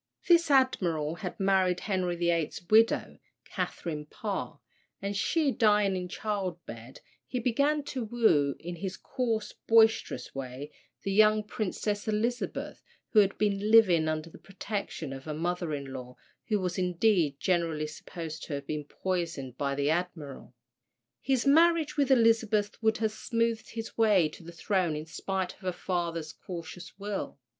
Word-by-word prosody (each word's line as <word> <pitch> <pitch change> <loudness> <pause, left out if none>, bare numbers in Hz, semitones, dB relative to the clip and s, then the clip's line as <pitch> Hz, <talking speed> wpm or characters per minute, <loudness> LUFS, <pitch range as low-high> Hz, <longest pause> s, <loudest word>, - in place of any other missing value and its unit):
This 340 -2 +5
Admiral 175 - +2
had 180 -1 -6
married 190 -2 +2
Henry 185 -4 -1
VIII.'s 170 -2 0
widow, 225 +1 +4 0.3
Catherine 150 -3 -4
Parr; 205 +4 -4 0.4
and 200 +1 -3
she 285 +8 +1
dying 210 -5 +3
in 180 -1 -3
childbed, 175 - -5 0.3
he 250 - -2
began 280 +5 +1
to 260 -4 -4
woo, 210 -12 +3
in 175 +1 -6
his 185 +1 -5
coarse 225 -4 -2
boisterous 225 -1 +3
way, 135 +2 -6 0.3
the 195 - -1
young 215 +1 +5
Princess 210 -1 -3
Elizabeth, 230 +3 -2 0.3
who 215 - +5
had 200 -1 +3
been 205 0 0
living 185 -8 +6
under 155 0 -2
the - - -13
protection 195 -7 -5
of 135 0 -9
her 155 -1 -4
mother 175 +1 -2
in 140 -2 -4
law, 125 -1 -8 0.3
who 210 -2 +1
was 180 -1 -2
indeed 180 -5 +2
generally 165 -4 0
supposed 160 +1 -7
to 155 - -6
have 140 0 -6
been 150 0 -4
poisoned 165 -7 -3
by 140 +1 -1
the 145 +1 +1
admiral. 160 -5 -4 0.7
His 265 -2 +1
marriage 320 +1 +4
with 280 -2 +2
Elizabeth 225 -4 +3
would 220 -1 +2
have 220 -1 0
smoothed 230 +1 -1
his 225 0 -6
way 200 -8 +4
to - - -13
the 170 +1 -10
throne 175 -1 0
in 150 +1 -5
spite 190 +3 -3
of - - -24
her 185 -1 -2
father's 170 -3 -3
cautious 170 0 -9
will. 200 -5 -4
190 Hz, 150 wpm, -29 LUFS, 160-220 Hz, 0.7 s, living